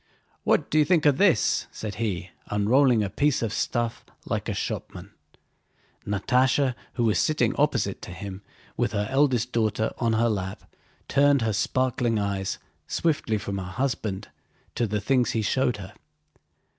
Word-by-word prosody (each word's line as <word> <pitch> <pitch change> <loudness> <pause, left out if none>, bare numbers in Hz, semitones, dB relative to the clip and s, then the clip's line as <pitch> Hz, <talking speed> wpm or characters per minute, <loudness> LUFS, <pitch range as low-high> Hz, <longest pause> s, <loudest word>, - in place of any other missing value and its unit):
"What - - +1
do 155 - +4
you - - +6
think 170 -1 +3
of 145 -2 +4
this?" 195 -5 +3
said 105 -2 -6
he, 95 -4 -2 0.2
unrolling 115 +3 +3
a 100 - -2
piece 145 -4 +1
of 110 -2 -2
stuff 120 -1 -1 0.2
like - - -2
a - - -1
shopman. - - -5 1.0
Natásha, 125 +6 +2 0.2
who 120 - -1
was 110 -2 +2
sitting 155 - +1
opposite 125 -9 0
to - - -8
him 95 +2 -7 0.3
with - - 0
her 105 -1 0
eldest 130 -3 +2
daughter 110 -1 0
on 115 -2 +1
her 115 +1 +3
lap, 95 -4 -3 0.4
turned 140 -2 +4
her 110 -1 0
sparkling 120 +1 0
eyes 100 -2 -2 0.3
swiftly 145 -9 0
from 100 -1 -4
her - - -4
husband 115 -6 -2 0.4
to 120 - 0
the 105 0 -1
things 125 +2 +2
he 110 - 0
showed 125 +1 +1
her. 95 0 -9
115 Hz, 155 wpm, -26 LUFS, 105-130 Hz, 1.0 s, you